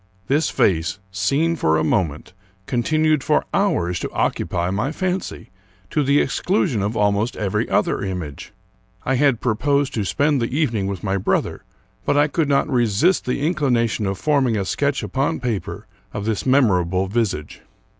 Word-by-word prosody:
This 145 +7 +1
face, 80 -2 +1
seen 140 +13 +1
for 80 - +2
a 80 - +1
moment, 80 -1 -1 0.3
con 120 -2 -1
tinued 155 +2 +2
for 150 - +1
hours 90 - +1
to - - -4
occupy 90 0 -1
my 110 +9 -1
fancy, 185 - -3 0.4
to 150 - +1
the 140 +1 +3
exckision 145 - 0
of 105 +3 -2
almost 105 +3 +1
every 100 -3 -1
other - - +1
image. 90 -7 -5 0.5
I 130 - +1
had 135 -3 +3
proposed 140 +4 +1
to 110 - -1
spend 145 +6 +1
the 120 +4 -2
evening 115 -11 0
with 100 -3 -5
my 100 -1 0
brother; 95 - -1 0.4
but - - +1
I 145 +1 +4
could 155 0 0
not 140 -1 +2
resist 120 - +2
the 125 +3 -2
inclina 135 -9 +1
tion 110 -2 -2
of 95 0 -2
forming 135 -5 +1
a 100 - -1
sketch 140 +6 -1
upon 140 +4 -1
paper 120 -6 -4 0.3
of 105 -1 -4
this 110 +2 -2
memorable 95 -9 +3
visage. 95 -8 -2
120 Hz, 165 wpm, -21 LUFS, 95-145 Hz, 0.5 s, I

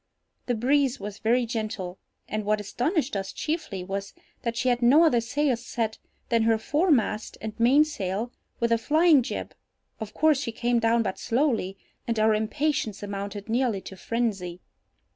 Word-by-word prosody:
The 245 - +1
breeze 270 +3 +2
was 205 0 -7
very 240 +2 +2
gentle, 215 -6 -4 0.3
and 215 0 -2
what 210 +1 +1
astonished 255 - -1
us 195 -1 -3
chiefly 305 - -3
was, 195 +1 -5 0.3
that 235 -1 -3
she 255 - +1
had 245 0 +1
no 270 +7 +6
other 245 -8 +4
sails 245 +1 0
set 225 -3 -3 0.3
than 230 -2 +3
her 225 0 +3
foremast 265 - +1
and 220 0 -5
mainsail, 240 -5 +2 0.3
with 235 0 +1
a 230 - +4
flying 310 +3 +5
jib—of 220 -2 -8
course 310 -3 +4
she 230 - -3
came 240 +1 +1
down 230 0 +3
but 190 - -3
slowly, 230 -7 0 0.3
and 230 -1 0
our 215 0 +4
impatience 220 -1 -1
amounted 200 +1 -5
nearly 235 -2 +1
to 190 - -9
phrensy. 195 -5 -2
230 Hz, 160 wpm, -26 LUFS, 210-260 Hz, 0.3 s, no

